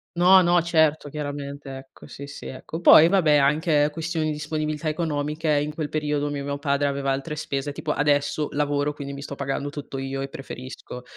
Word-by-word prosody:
No, 185 +2 +7
no, 175 0 +4
certo, 160 -3 +2
chiaramente. 145 -1 -6
Ecco, 135 0 -14
sì, 140 - -9
sì, 140 - -9
ecco. 155 +5 -7
Poi 160 -1 +8
vabbè, 170 -6 +4
anche 150 +1 +3
questioni 165 0 -2
di - - 0
disponibilità 155 +1 -3
economiche 155 -1 -2
in 150 +1 -2
quel 155 -1 -3
periodo 150 -1 -1
mi 145 -1 -3
mio 140 0 -3
padre 140 0 0
aveva 140 -1 -1
altre 135 +3 -3
spese, 145 -1 -3
tipo 150 +2 -3
adesso 145 0 +1
lavoro, 145 0 0
quindi 140 -1 -7
mi 140 - -7
sto 140 0 -7
pagando 140 +1 -3
tutto 145 -2 -7
io 135 0 -4
e 135 - -3
preferisco. 130 -2 -9
145 Hz, 190 wpm, -24 LUFS, 140-155 Hz, -, Poi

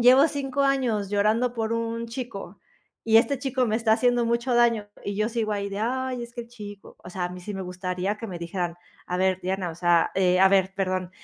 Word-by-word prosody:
llevo 260 +6 +7
5 280 -1 -1
años 245 -8 +1
llorando 215 +4 +2
por 225 -1 -1
un 230 0 -2
chico 230 -6 -7 0.4
y 225 0 +5
este 275 +5 +4
chico 260 -2 0
me 215 - 0
está 225 -1 +1
haciendo 245 +1 +3
mucho 235 +2 0
daño 230 -3 +3 0.2
y 200 0 -3
yo 215 +1 +1
sigo 225 -2 -2
ahí 200 -1 -2
de: 200 +1 -4
"Ay, 255 +1 -1
es 235 0 -9
que 240 - -4
el 230 - -16
chico". 205 -4 -11
O 180 - -10
sea, 180 0 -3
a - - -1
mí 180 0 -8
sí 205 +4 -6
me 195 -1 -4
gustaría 180 +2 -3
que 225 +1 -7
me 175 -3 -6
dijeran: 170 0 -3 0.3
"A 180 - -2
ver, 185 0 +1
Diana", 185 -1 -2
o - - -8
sea, 175 0 +3
eh, 185 -1 +3
a 190 - +7
ver, 190 -1 +3
perdón, 185 -2 -1
215 Hz, 235 wpm, -25 LUFS, 185-240 Hz, 0.4 s, llevo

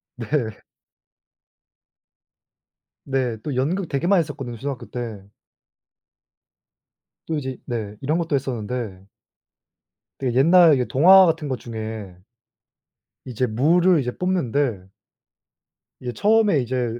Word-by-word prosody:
네. 115 -2 -3 2.5
네 130 -4 -1
또 145 -4 -4
연극 165 +9 -1
되게 140 +4 -1
많이 195 -1 +4
했었거든요 140 -6 -6
초등학교 135 +2 -6
때. 115 -5 -6 2.0
또 160 - -2
이제 130 -3 -5
네 110 -4 -4
이런 150 +4 0
것도 165 -4 -1
했었는데 120 -6 -4 1.1
되게 125 -2 -2
옛날 170 +2 +6
이게 125 -2 0
동화 185 +10 +7
같은 160 -3 0
것 130 -3 -3
중에 110 -4 -7 1.1
이제 125 0 -2
무를 165 +10 +3
이제 125 -1 -3
뽑는데 140 - -1 1.1
이제 125 - -5
처음에 210 - +3
이제 120 -2 -2
130 Hz, 210 characters per minute, -22 LUFS, 120-160 Hz, 2.5 s, 동화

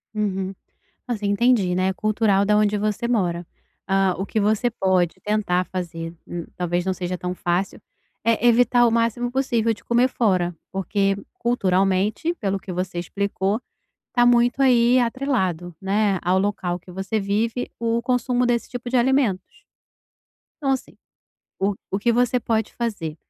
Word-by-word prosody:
Uhum. 195 -2 -1 0.5
Assim, 215 -4 -2
entendi, 205 -2 +3
né, 185 +1 +1
é - - -1
cultural 210 -1 +2
da 210 +1 +3
onde 210 0 +2
você 215 +3 -1
mora, 175 -7 0 0.4
hã, 195 -1 +3
o 190 - -2
que 220 - -1
você 215 +3 +2
pode 185 -6 +1
tentar 200 -4 +1
fazer, 170 -3 -5
n 175 -1 -5
talvez 175 0 -1
não 190 - +1
seja 180 0 -4
tão 180 0 -3
fácil, 175 +2 -2 0.4
é 230 +1 +2
evitar 240 +1 +5
o - - +1
máximo 235 +1 0
possível 240 -4 +1
de 205 - -14
comer 240 +2 +2
fora, 185 -8 +1 0.2
porque 195 +1 0 0.2
culturalmente, 195 - +1
pelo 195 - -2
que 185 - -7
você 180 0 -3
explicou, 200 +4 -2 0.5
está 245 -1 +2
muito 245 +2 +3
aí 245 -1 +5
atrelado, 230 - -1
né, 200 0 +1
ao 180 +2 +2
local 190 -3 -1
que 180 +1 -14
você 190 +4 -2
vive 220 +5 -1
o 230 0 +1
consumo 250 0 +1
desse 240 -1 0
tipo 245 0 -6
de 255 - +1
alimentos, 245 -6 +1 0.9
então 275 -3 -1
assim, 265 - -4 0.6
o 200 +1 +1 0.2
o 195 - 0
que 235 +3 +2
você 245 +1 +2
pode 225 -2 -1
fazer 200 -10 -3
205 Hz, 155 wpm, -23 LUFS, 185-235 Hz, 0.9 s, evitar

